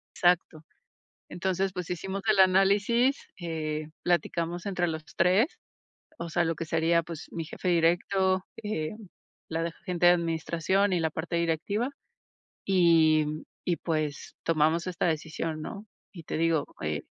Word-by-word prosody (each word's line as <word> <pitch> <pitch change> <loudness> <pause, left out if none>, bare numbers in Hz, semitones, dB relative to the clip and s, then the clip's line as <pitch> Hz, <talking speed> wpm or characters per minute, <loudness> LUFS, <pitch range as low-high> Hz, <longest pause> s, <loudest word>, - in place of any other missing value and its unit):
Exacto. 175 -3 +2 0.7
Entonces, 190 +1 -1
pues, 180 -2 -5
hicimos 190 +3 -3
el 215 -2 +4
análisis, 200 +7 +4
eh, 155 -3 -3 0.2
platicamos 175 0 0
entre 185 -3 0
los 160 -1 -4
3, 200 - +3 0.6
o 170 - -4
sea, 175 +1 +1
lo 165 0 0
que 165 - -4
sería, 165 +1 +2
pues, 165 -2 -8
mi 165 - -4
jefe 170 +3 -5
directo, 185 +2 +2 0.2
eh, 185 -8 -2 0.6
la 165 0 -1
de 170 - -1
agente 175 +1 -2
de 175 - +9
administración 170 +3 +1
y 180 - +2
la 160 -1 +1
parte 160 +2 -4
directiva, 170 - 0 0.8
y 165 -5 +4 0.4
y, 175 - +1
pues, 155 -4 -3
tomamos 165 +2 +2
esta 175 -1 -1
decisión, 160 0 -2
¿no? 205 +6 -7 0.3
Y 170 -4 -10
te - - -4
digo, 165 -2 +2 0.2
eh, 75 -1 -2
170 Hz, 145 wpm, -28 LUFS, 160-185 Hz, 0.8 s, de